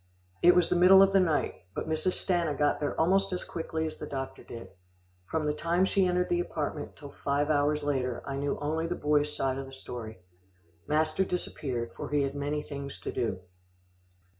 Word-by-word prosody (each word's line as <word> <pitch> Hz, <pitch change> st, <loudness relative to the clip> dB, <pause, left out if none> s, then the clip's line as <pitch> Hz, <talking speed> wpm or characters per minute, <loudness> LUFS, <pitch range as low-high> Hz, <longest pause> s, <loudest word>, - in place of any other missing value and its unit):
It 175 Hz, +1 st, +7 dB
was 180 Hz, -2 st, +4 dB
the -, -, +1 dB
middle 185 Hz, +2 st, +8 dB
of 195 Hz, 0 st, +3 dB
the 195 Hz, -, +6 dB
night, 165 Hz, -5 st, +1 dB, 0.2 s
but -, -, -3 dB
Mrs. 160 Hz, +4 st, 0 dB
Stanna 170 Hz, -5 st, +1 dB
got 145 Hz, -1 st, +2 dB
there 145 Hz, -, -2 dB
almost 195 Hz, +4 st, +3 dB
as 180 Hz, -, -2 dB
quickly 160 Hz, -1 st, -3 dB
as 155 Hz, -, -5 dB
the -, -, -6 dB
doctor 135 Hz, -1 st, -5 dB
did. 115 Hz, -1 st, -9 dB, 0.6 s
From 160 Hz, -1 st, -1 dB
the 150 Hz, -, +1 dB
time 170 Hz, +4 st, +1 dB
she 190 Hz, -1 st, +2 dB
entered 180 Hz, 0 st, +1 dB
the 175 Hz, -, +1 dB
apartment 155 Hz, -4 st, -3 dB
till 145 Hz, -2 st, -10 dB
five 145 Hz, +2 st, 0 dB
hours 150 Hz, 0 st, +2 dB
later, 130 Hz, -4 st, -1 dB
I 135 Hz, -, -4 dB
knew 140 Hz, +1 st, -1 dB
only 160 Hz, +3 st, -1 dB
the 175 Hz, -, -2 dB
boy's 150 Hz, -1 st, +1 dB
side 135 Hz, 0 st, -1 dB
of 135 Hz, -, -6 dB
the -, -, -11 dB
story. 120 Hz, -5 st, -7 dB, 0.7 s
Master 155 Hz, +4 st, +2 dB
disappeared, 130 Hz, -10 st, -3 dB
for -, -, -6 dB
he 145 Hz, -1 st, +2 dB
had 135 Hz, 0 st, -2 dB
many 145 Hz, +1 st, -2 dB
things 140 Hz, -1 st, -7 dB
to -, -, -4 dB
do. 115 Hz, -7 st, -2 dB
150 Hz, 200 wpm, -29 LUFS, 140-175 Hz, 0.7 s, middle